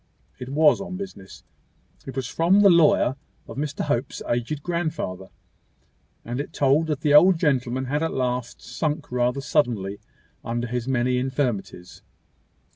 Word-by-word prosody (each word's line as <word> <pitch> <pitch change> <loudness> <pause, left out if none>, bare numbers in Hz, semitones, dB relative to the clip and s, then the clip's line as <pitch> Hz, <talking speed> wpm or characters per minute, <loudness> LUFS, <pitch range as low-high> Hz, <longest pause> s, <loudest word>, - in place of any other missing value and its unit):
It 125 - -7
was 150 +6 +4
on 195 -1 -6
business. 185 - -9 0.6
It 135 - -7
was 135 -2 -2
from 175 +9 +3
the 200 -2 +7
lawyer 150 -5 +4 0.3
of - - -9
Mr 145 0 -3
Hope's 120 +3 -2
aged 120 +5 -2
grandfather; 155 - -3 1.0
and 120 +2 -4
it 145 +3 -5
told 145 +3 +2
that 150 -2 -2
the 150 -1 +2
old 175 +4 +7
gentleman 130 -5 0
had 145 +4 -1
at 165 - -1
last 125 -1 -3
sunk 150 +4 -3
rather 125 +2 0
suddenly 115 -9 0 0.4
under 120 +1 -2
his 125 0 -3
many 125 -1 +1
infirmities. 125 -9 -3
135 Hz, 145 wpm, -24 LUFS, 120-155 Hz, 1.0 s, the